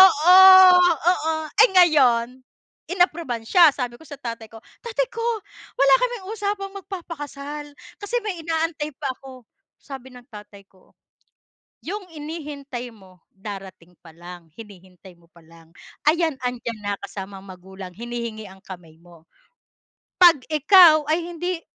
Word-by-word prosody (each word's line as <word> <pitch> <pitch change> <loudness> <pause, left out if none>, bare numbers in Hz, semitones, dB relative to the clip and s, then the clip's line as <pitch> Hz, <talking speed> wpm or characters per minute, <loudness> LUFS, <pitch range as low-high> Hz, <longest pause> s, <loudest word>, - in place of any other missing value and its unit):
O - - +11
oo, 350 -1 +4 0.8
oo. 320 -3 -1 0.3
Eh - - +6
ngayon, 255 -8 +3 0.5
inapruban 335 -10 -1
siya. 345 +5 +6
Sabi 245 -3 -5
ko - - -15
sa 285 - -9
tatay 230 -3 -7
ko, 225 - -14 0.2
"Tatay 470 +1 -2
ko, 460 - -7 0.6
wala 275 0 +4
kaming 485 -6 -3
usapang 400 -2 -4
magpapakasal. 295 -6 -8 0.3
Kasi 410 +4 -4
may 380 -6 -5
inaantay 320 -2 -3
pa 275 -4 -4
ako." 260 -2 -14 0.3
Sabi 265 -2 -11
ng 245 -1 -14
tatay 205 -1 -13
ko, 185 -1 -28 0.9
"Yung 390 +2 -7
hinihintay 290 -5 -8
mo 185 -4 -21
darating 190 -3 -11
pa 165 - -16
lang, 175 0 -12
hinihintay 190 -3 -15
mo 170 - -26
pa 170 0 -21
lang. 165 0 -20 0.4
Ayan, 320 -3 +1
andiyan 240 -3 -5
na, 205 0 -2
kasama 195 0 -8
ang - - -16
magulang, 190 0 -12
hinihingi 235 -2 -7
ang 190 0 -16
kamay 175 -4 -12
mo. 170 -1 -20 0.9
'Pag 330 -8 +6
ikaw 310 0 +5
ay 320 - +1 0.2
hindi 355 +1 -4
260 Hz, 140 wpm, -22 LUFS, 200-330 Hz, 0.9 s, O